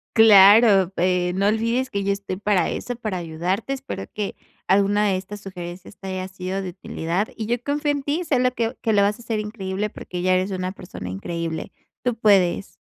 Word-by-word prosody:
Claro, 205 -2 +7
eh, 180 0 +1
no 200 +1 +2
olvides 230 +4 +1
que 200 -1 -2
yo 200 - +1
estoy 200 -1 -3
para 200 -1 +1
eso, 245 -1 -4
para 215 -5 -3
ayudarte, 175 +8 -3
espero 270 - -5
que, 210 -2 -3 0.3
alguna 200 +2 +3
de 195 - +2
estas 190 +3 -6
sugerencias 180 0 -9
te 195 - -9
haya 185 0 -3
sido 190 +1 -4
de 190 - -4
utilidad 180 +2 -3
y 220 - -4
yo 240 +2 -1
confío 290 +2 0
en 285 -1 -3
ti 295 +5 -1
solo 255 -6 +1
que 230 0 -2
que 225 - +1
lo 205 - +4
vas 205 +2 +1
a - - -11
hacer 225 -2 -2
increíble 210 -1 -3
porque 180 -3 -7
ya 185 +1 +2
eres 185 +2 +1
una 185 -1 -2
persona 175 - -8
increíble. 160 - -4 0.3
Tú 245 -2 0
puedes. 195 -4 +2
200 Hz, 200 wpm, -23 LUFS, 185-225 Hz, 0.3 s, Claro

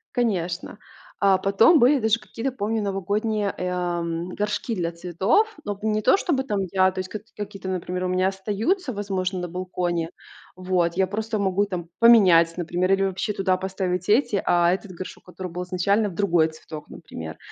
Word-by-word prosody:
Конечно. 190 -5 -1 0.4
А, 195 -1 +4
потом 225 - +5
были 270 +4 +5
даже 220 0 +2
какие-то, 230 +4 -4
помню, 225 -2 -2
новогодние, 205 +2 -1
э, 180 - -2
а, 175 -1 -1
м, 170 +1 -3
горшки 210 +3 -2
для 170 -3 -1
цветов. 185 - +1
Но 205 - -1
б - - -21
не 215 0 +1
то - - +6
чтобы 320 -9 0
там 210 -6 -2
я, 190 -1 +3
то 185 - -6
есть 185 0 -4
каки 215 +2 -9
какие-то, 200 -2 -6
например, 180 0 -3
у - - 0
меня 185 +1 +1
остаются, 215 - -1
возможно, 190 -2 -2
на 180 - -3
балконе. 175 -1 -3 0.4
Вот. 180 -2 0
Я 190 0 +2
просто 215 +2 -3
могу 195 0 +1
там 180 -4 -5
поменять, 185 -8 +6
например, 175 +2 -1
или 195 - +2
вообще 195 +2 -1
туда 190 -2 +1
поставить 185 -1 -3
эти, 215 -2 +3
а 175 0 +4
этот 190 +1 -3
горшок, 185 +1 -9
который 180 0 -7
был 180 +1 -4
изначально, 200 +4 +1
в - - -9
другой 170 -5 +2
цветок, 155 -1 -10
например. 80 0 -9
190 Hz, 185 wpm, -24 LUFS, 180-210 Hz, 0.4 s, то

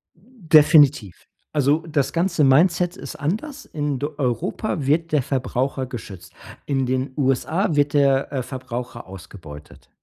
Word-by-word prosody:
Definitiv. 155 - +3 0.3
Also 150 +2 +1
das 150 -4 -1
ganze 170 -2 +1
Mindset 170 +6 +3
ist 140 - -9
anders. 215 - -4
In 145 -3 -3
d 145 - -2
Europa 135 - -2
wird 165 +4 +1
der 150 -2 +2
Verbraucher 130 +1 -2
geschützt, 100 -8 -10 0.3
in 135 -2 0
den 130 +1 -2
USA 150 +6 0
wird 145 0 +1
der, 140 -2 +2
äh, 135 -3 -2
Verbraucher 125 -2 -7
ausgebeutet. 85 -5 -12
140 Hz, 130 wpm, -22 LUFS, 130-160 Hz, 0.3 s, Definitiv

